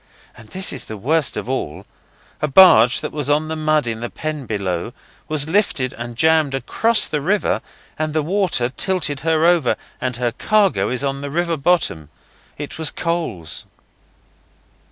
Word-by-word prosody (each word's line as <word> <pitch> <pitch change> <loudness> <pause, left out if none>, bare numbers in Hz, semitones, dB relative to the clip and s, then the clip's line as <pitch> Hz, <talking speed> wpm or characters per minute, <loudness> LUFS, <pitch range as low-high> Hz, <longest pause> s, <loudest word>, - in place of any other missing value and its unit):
And 110 - -15
this 190 0 0
is 130 -3 -5
the 110 - -7
worst 150 +9 +1
of - - -4
all 130 - -4 0.6
a 150 - +1
barge, 140 -7 +6
that 150 - -4
was 145 -2 -2
on 150 +2 +1
the 160 - -2
mud 155 -2 +1
in 115 -1 -3
the 120 0 -4
pen 155 -5 -5
below, 100 0 -3 0.3
was 155 -2 +1
lifted 160 -8 0
and 120 0 -7
jammed 155 0 +3
across 225 +11 +2
the 150 - -2
river 190 +4 0 0.4
and 155 0 -1
the 155 0 0
water 175 -8 +1
tilted 155 -2 -1
her 160 +1 +1
over, 170 -7 +3 0.3
and 125 -1 -2
her 120 -1 0
cargo 205 - +1
is 125 +2 -2
on 140 0 -2
the 145 - -5
river 170 +3 0
bottom. 140 - 0 0.5
It 145 +2 -7
was 160 -2 +1
coals. 165 - -3
150 Hz, 170 wpm, -20 LUFS, 125-165 Hz, 0.6 s, barge